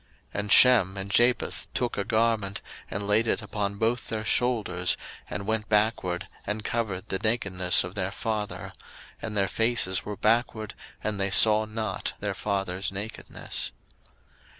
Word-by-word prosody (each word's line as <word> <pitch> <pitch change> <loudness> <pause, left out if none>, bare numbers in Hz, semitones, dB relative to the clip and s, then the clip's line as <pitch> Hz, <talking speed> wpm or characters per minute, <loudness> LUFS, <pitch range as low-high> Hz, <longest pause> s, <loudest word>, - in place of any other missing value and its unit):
01:009:023 - - -2
And 105 0 -3
Shem 105 -7 +7
and 95 +1 -5
Japheth 120 +4 +2
took 125 -1 -1
a 100 - -1
garment, 110 -2 0 0.3
and 100 +1 -4
laid 110 +3 +2
it - - 0
upon 100 -1 -3
both 115 +3 0
their 110 -1 -3
shoulders, 110 -7 +1 0.3
and 100 +2 -5
went 110 0 -1
backward, 105 -4 +1 0.2
and 105 +1 -3
covered 105 -6 -3
the 95 - 0
nakedness 95 -5 +2
of 90 0 -7
their 95 -2 -2
father; 105 0 -4 0.5
and 105 -1 -4
their 100 -1 +2
faces 115 -3 +1
were 105 -1 -6
backward, 110 -1 +1 0.3
and 105 -2 -2
they 100 0 +1
saw 110 +2 +6
not 110 0 -4
their - - -2
father's 95 -1 -2
nakedness. 100 +3 -3
105 Hz, 150 wpm, -27 LUFS, 95-110 Hz, 0.5 s, Shem